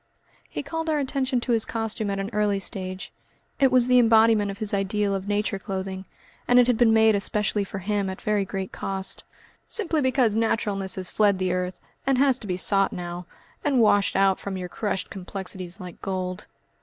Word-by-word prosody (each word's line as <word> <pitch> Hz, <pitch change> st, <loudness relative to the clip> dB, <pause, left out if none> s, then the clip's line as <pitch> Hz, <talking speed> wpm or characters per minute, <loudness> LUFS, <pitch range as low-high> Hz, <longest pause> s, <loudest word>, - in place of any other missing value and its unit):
He -, -, -5 dB
called 325 Hz, 0 st, -3 dB
our 310 Hz, -, +2 dB
attention 265 Hz, -2 st, 0 dB
to 245 Hz, -, -2 dB
his 225 Hz, -2 st, +2 dB
costume 225 Hz, -1 st, -2 dB
at 195 Hz, -, -2 dB
an 195 Hz, +2 st, -3 dB
early 205 Hz, -1 st, +1 dB
stage. 185 Hz, -1 st, -5 dB, 0.5 s
It 270 Hz, -2 st, +4 dB
was 250 Hz, -1 st, +4 dB
the 250 Hz, 0 st, +6 dB
embodiment 225 Hz, -2 st, +5 dB
of 200 Hz, -, -5 dB
his 215 Hz, -2 st, -1 dB
ideal 200 Hz, +1 st, 0 dB
of 195 Hz, 0 st, -3 dB
Nature 205 Hz, 0 st, -1 dB
clothing, 190 Hz, -1 st, -5 dB, 0.4 s
and 245 Hz, -, +5 dB
it 245 Hz, -, +6 dB
had 245 Hz, -1 st, +2 dB
been 225 Hz, 0 st, +4 dB
made 220 Hz, 0 st, +5 dB
especially 205 Hz, +1 st, 0 dB
for 195 Hz, -, -6 dB
him 200 Hz, +1 st, -1 dB
at 190 Hz, -, -6 dB
very 210 Hz, -1 st, 0 dB
great 195 Hz, -1 st, -5 dB
cost. 190 Hz, 0 st, -3 dB, 0.4 s
"Simply 335 Hz, -9 st, 0 dB
because 255 Hz, -5 st, +2 dB
naturalness 205 Hz, -4 st, 0 dB
has 185 Hz, -2 st, -3 dB
fled 205 Hz, -2 st, +3 dB
the 185 Hz, -1 st, 0 dB
earth, 180 Hz, 0 st, -3 dB, 0.3 s
and 270 Hz, -1 st, +3 dB
has 265 Hz, -1 st, +3 dB
to 215 Hz, -, -9 dB
be 180 Hz, -1 st, -1 dB
sought 195 Hz, +1 st, +2 dB
now, 175 Hz, 0 st, -6 dB, 0.4 s
and 280 Hz, -4 st, +2 dB
washed 205 Hz, -3 st, +3 dB
out 195 Hz, -1 st, +3 dB
from 195 Hz, -1 st, -5 dB
your 180 Hz, -1 st, -5 dB
crushed 200 Hz, 0 st, -3 dB
complexities 185 Hz, -1 st, -6 dB
like 180 Hz, -2 st, -10 dB
gold." 185 Hz, 0 st, -4 dB
205 Hz, 195 wpm, -25 LUFS, 190-230 Hz, 0.5 s, the